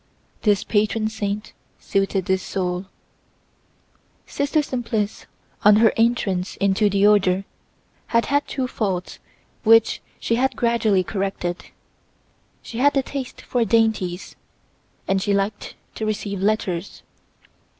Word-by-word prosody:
This 205 -2 +2
patron 215 +1 +1
saint 210 -1 -4 0.2
suited 195 -1 -1
this 190 0 +1
soul. 180 -1 -3 1.4
Sister 290 +2 0
Simplice, 230 -6 -3 0.4
on 210 0 +7
her 220 +1 +5
entrance 210 -6 0
into 200 +2 +2
the 200 0 +2
order, 195 -2 +3 0.6
had 230 0 +2
had 285 +1 +1
two 265 -2 -2
faults 190 -7 -3 0.4
which 225 0 +5 0.2
she 230 - 0
had 265 +2 +1
gradually 225 -5 +2
corrected: 190 -2 -3 1.0
she 230 - -7
had 285 +2 +4
a 270 - +2
taste 265 -1 -6
for 245 -2 0
dainties, 220 -6 0 0.7
and 195 0 +1
she 200 +1 +1
liked 200 +1 -2 0.2
to 220 - -4
receive 200 -2 -3
letters. 195 -3 -1
210 Hz, 120 wpm, -22 LUFS, 195-230 Hz, 1.4 s, on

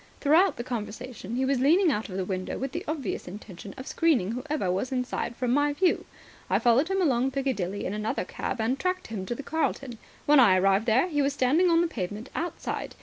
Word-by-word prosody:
Throughout 325 +7 +4
the 240 - -4
conversation 235 -1 -6
he 260 +1 +1
was 270 -1 +1
leaning 330 +6 +4
out 215 -3 -2
of 185 - -5
the 190 - -1
window 185 -1 -3
with 270 0 -3
the - - -4
obvious 295 -8 -3
intention 195 0 -9
of 260 - -7
screening 270 - +1
whoever 255 -5 -2
was 195 +8 -2
inside 250 -2 -2
from 245 0 -1
my 290 +2 +2
view. 360 +4 +1 0.4
I - - +3
followed 245 +6 +3
him 385 0 +1
along 260 -4 +2
Piccadilly 255 -9 -2
in 190 - -2
another 210 -2 -2
cab, 235 - -4
and 240 +5 0
tracked 365 +2 -1
him 195 -4 -5
to 240 - -2
the 285 - -7
Carlton. 275 -6 -2 0.3
When 295 -1 +6
I 200 -7 +6
arrived 195 +4 +2
there 245 +9 +4
he 295 -5 0
was 280 0 +1
standing 290 +7 +3
on 335 0 +4
the 345 - +2
pavement 210 - -5
outside. 340 +2 -4
255 Hz, 215 wpm, -27 LUFS, 215-290 Hz, 0.4 s, When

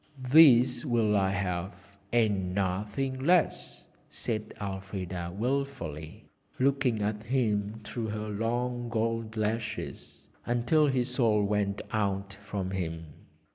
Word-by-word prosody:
'These 130 -3 +6
will 115 -6 +2
I 95 -1 +3
have, 95 +1 -4 0.2
and 100 -6 +1
nothing 105 +8 -1
less,' 175 +2 +1 0.2
said 110 -1 -3
Elfrida 95 -3 -4
wilfully, 110 - -3 0.3
looking 130 -5 +2
at 105 0 -1
him 110 -3 0
through 110 +2 -4
her 105 0 -4
long 120 +3 -2
gold 115 -1 -2
lashes 110 +1 -4 0.2
until 120 +6 +2
his 125 -2 0
soul 110 -4 +3
went 100 -1 0
out 100 -2 -1
from 100 -2 -4
him. 80 -4 -4
110 Hz, 110 wpm, -29 LUFS, 100-120 Hz, 0.3 s, These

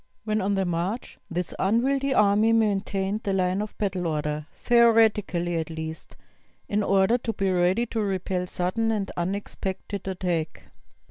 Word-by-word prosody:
When 215 -1 0
on 200 +1 +1
the 195 -1 +1
march 175 +7 -3
this 175 0 -3
unwieldy 265 +7 +1
army 210 -1 +4
maintained 205 -1 0
the 200 - -1
line 185 +1 +1
of 210 - -6
battle 185 -4 -1
order, 150 -1 -2
theoretically 220 -7 +3
at 160 -1 -3
least, 160 0 -7 0.5
in 205 +1 0
order 195 +4 +3
to 230 - -2
be 195 -2 0
ready 185 +6 +2
to 225 -1 -2
repel 185 -2 -1
sudden 185 +6 -1
and 205 -3 -2
unexpected 195 +1 -4
attack. 175 -4 -3
195 Hz, 145 wpm, -26 LUFS, 180-215 Hz, 0.5 s, army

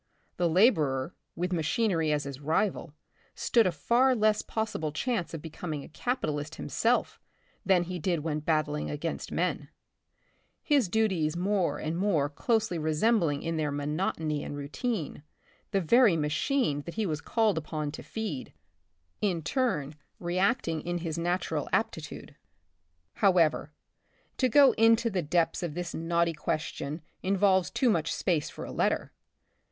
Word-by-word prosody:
The 175 -1 +2
laborer, 160 - +3 0.2
with 180 +2 -2
machinery 165 -1 +1
as 150 -1 +1
his 140 -1 -7
rival, 160 +1 -1 0.4
stood 230 -5 +3
a - - +1
far 240 - +3
less 215 -1 +3
possible 215 -9 -3
chance 195 - -2
of 165 -3 -7
becoming 155 -2 -5
a - - -12
capitalist 155 - -2
himself 235 +2 0 0.4
than 185 -3 +3
he 180 0 -5
did 170 -1 0
when 155 -1 -2
battling 150 -1 0
against 155 +3 -4
men; 165 -5 -1 0.9
his 280 - +2
duties 180 -7 +1
more 190 0 +1
and 155 +2 -3
more 165 -8 +2
closely 220 - 0
resembling 155 0 +1
in 165 0 -2
their 155 -1 0
monotony 150 +1 -2
and 145 - -6
routine, 155 - -3 0.5
the 195 -2 +1
very 215 0 +5
ma 150 -1 0
chine 160 - 0
that 170 - -7
he 220 -1 0
was 155 -4 -2
called 215 -8 +1
on 150 -2 -2
to 155 - -8
feed, 210 - -5 0.7
in 180 -6 0
turn 155 - 0 0.3
re 175 +1 -2
acting 185 -6 +1
in 175 0 -2
his 165 -1 -3
natural 170 -3 -1
aptitude. 190 -9 -3 0.8
However, 180 -5 +3 0.7
to 255 - +2
go 280 +3 +7
into 230 +1 +4
the 185 -2 0
depths 165 +2 +1
of 170 -4 -4
this 175 -1 -4
knotty 170 0 +1
question 155 0 -3 0.2
involves 190 -1 +3
too 250 -3 +2
much 165 -6 0
space 165 -6 0
for - - -8
a - - -7
letter. - - 0
170 Hz, 145 wpm, -29 LUFS, 155-210 Hz, 0.9 s, go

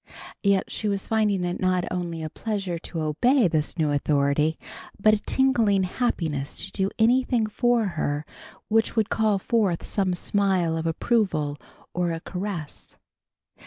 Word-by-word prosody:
Yet 200 -2 +1
she 215 - -3
was 200 -1 -1
finding 210 -4 +1
it 175 0 -2
not 185 -1 +1
only 170 -3 -3
a 155 - -4
pleasure 195 -6 -3
to 165 0 -5
obey 230 - +3
this 155 -1 -1
new 155 -3 +1
authority 145 +2 +1 0.4
but 215 +2 +5
a 215 - +2
tingling 225 -7 +2
happiness 165 - -2
to - - -9
do 190 0 0
anything 240 0 +3
for 240 +1 +1
her 150 -5 -2 0.4
which 225 +1 +1
would 220 -2 +1
call 215 -2 +2
forth 195 -4 0
some 190 -3 0
smile 185 -3 +1
of 165 0 -2
approval 165 -5 0 0.4
or 175 -1 0
a 165 - -4
caress. 180 -4 -6
190 Hz, 150 wpm, -25 LUFS, 165-215 Hz, 0.4 s, but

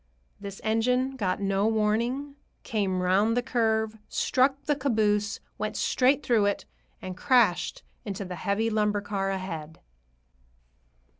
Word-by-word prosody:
This 200 -1 -8
engine 250 +4 +1
got 190 -7 -1
no 195 +1 +1
warning, 230 +6 0 0.3
came 190 -4 -1
round 205 +6 +3
the 245 - +1
curve, 220 -2 0
struck 270 +2 +1
the 295 - +1
caboose, 215 -6 +1 0.2
went - - -3
straight 270 +3 +2
through 220 -4 +3
it, 200 - -1 0.4
and 185 -1 -5
crashed 240 -5 +2 0.2
into 200 -1 -5
the 180 0 -6
heavy 215 +5 0
lumber 210 -1 +1
car 195 -1 -2
ahead. 165 -5 -5
215 Hz, 130 wpm, -27 LUFS, 195-245 Hz, 0.4 s, round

